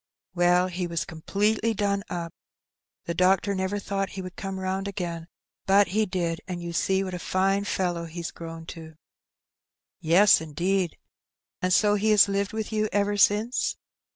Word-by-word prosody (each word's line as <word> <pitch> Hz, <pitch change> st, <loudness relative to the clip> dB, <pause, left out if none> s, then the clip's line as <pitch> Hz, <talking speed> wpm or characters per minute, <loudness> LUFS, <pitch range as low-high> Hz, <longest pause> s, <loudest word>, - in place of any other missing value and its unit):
Well, 175 Hz, 0 st, +3 dB
he 180 Hz, -1 st, -3 dB
was 170 Hz, -1 st, -2 dB
completely 210 Hz, +6 st, 0 dB
done 200 Hz, -1 st, 0 dB
up; 170 Hz, -2 st, -4 dB, 0.7 s
the 170 Hz, -, -2 dB
doctor 190 Hz, +3 st, +2 dB
never 190 Hz, +1 st, -1 dB
thought 195 Hz, 0 st, -2 dB
he 190 Hz, -, -7 dB
would 185 Hz, 0 st, -8 dB
come 195 Hz, -2 st, -5 dB
round 190 Hz, +1 st, -2 dB
again, 170 Hz, -4 st, -4 dB, 0.4 s
but 195 Hz, 0 st, +5 dB
he 215 Hz, +3 st, +1 dB
did, 170 Hz, -3 st, -2 dB
and 180 Hz, -2 st, -4 dB
you 170 Hz, 0 st, -6 dB
see 190 Hz, +3 st, +1 dB
what 185 Hz, -1 st, -5 dB
a 180 Hz, -, -4 dB
fine 195 Hz, +2 st, 0 dB
fellow 175 Hz, -4 st, -1 dB
he's 170 Hz, +1 st, -6 dB
grown 165 Hz, -1 st, -9 dB
to." 160 Hz, -1 st, -11 dB, 0.6 s
" -, -, -67 dB, 0.2 s
Yes, 175 Hz, +4 st, +5 dB
indeed! 175 Hz, +3 st, -1 dB, 0.6 s
And 185 Hz, -, 0 dB
so 205 Hz, +3 st, +4 dB
he 210 Hz, +1 st, +1 dB
has 210 Hz, -2 st, +6 dB
lived 200 Hz, 0 st, -1 dB
with 220 Hz, 0 st, -4 dB
you 215 Hz, 0 st, 0 dB
ever 205 Hz, 0 st, +1 dB
since 210 Hz, +4 st, +2 dB
190 Hz, 170 wpm, -26 LUFS, 175-200 Hz, 0.7 s, has